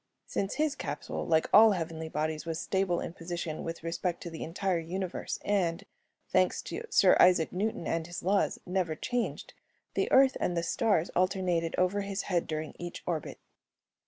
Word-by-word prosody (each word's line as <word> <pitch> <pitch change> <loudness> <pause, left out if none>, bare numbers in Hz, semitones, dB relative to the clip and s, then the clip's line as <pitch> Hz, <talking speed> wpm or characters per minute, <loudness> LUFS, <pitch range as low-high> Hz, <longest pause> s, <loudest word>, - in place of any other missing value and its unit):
Since 195 - -2
his 305 -1 +1
capsule, - - -5
like 160 -2 +3
all 220 0 +8
heavenly 160 -2 -4
bodies, 155 0 -2
was 165 0 -3
stable 190 -3 0
in - - -5
position 170 -2 -5
with 165 -1 -5
respect 170 +1 -2
to 170 - -6
the 160 - -6
entire 180 +2 -1
universe 180 +2 -4
and, 190 -3 +1 0.4
thanks 185 -1 +2
to 445 +5 -5
Sir 195 - +6
Isaac 180 -3 +5
Newton 200 -2 -2
and 165 0 -1
his 175 - -6
laws, 195 +2 +2
never 180 -3 -1
changed, 245 +8 -3 0.4
the - - 0
Earth 265 0 +6
and 175 - 0
the 170 - 0
stars 200 -4 +1
alternated 180 -3 +1
over 185 +3 +2
his 200 0 -3
head 175 -3 0
during 155 -1 -4
each 175 0 -6
orbit. 165 -4 -3
175 Hz, 170 wpm, -30 LUFS, 165-195 Hz, 0.4 s, all